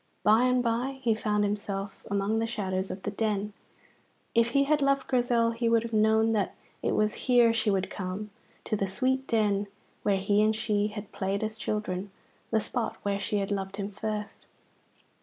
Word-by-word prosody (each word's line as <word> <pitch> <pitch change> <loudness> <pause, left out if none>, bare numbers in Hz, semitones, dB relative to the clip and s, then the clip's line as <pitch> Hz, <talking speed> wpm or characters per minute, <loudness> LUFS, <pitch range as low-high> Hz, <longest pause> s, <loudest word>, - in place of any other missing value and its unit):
By 220 +4 +5
and 250 -1 +3
by 245 +3 -1
he 230 -2 +3
found 210 -1 0
himself 200 -1 -3
among 200 +2 +1
the 225 - 0
shadows 190 -4 -2
of 190 - -6
the 205 - -2
Den. 210 -1 -1 0.8
If 230 0 +4
he 275 +3 +3
had 295 +1 +2
loved 275 -1 +2
Grizel 240 -2 +2
he 230 0 0
would 230 -1 +3
have 230 -1 -6
known 220 +1 +4
that 210 -3 0 0.3
it - - 0
was 215 0 +2 0.2
here 240 -2 +6
she 230 -1 +1
would 195 -1 0
come, 195 +2 -5 0.3
to 215 - -1
the 195 -1 -1
sweet 260 +7 0
Den 205 -3 +1 0.3
where 200 -2 +2
he 200 +2 +2
and 215 +1 +3
she 210 -2 +1
had 210 0 -7
played 195 +2 -2
as 215 0 -2
children, 205 -3 -3 0.4
the 220 - +2
spot 230 +1 -2
where 200 0 0
she 205 +1 -1
had 200 0 -1
loved 195 -1 -2
him 200 0 -4
first. 210 +1 -5
215 Hz, 190 wpm, -28 LUFS, 200-230 Hz, 0.8 s, here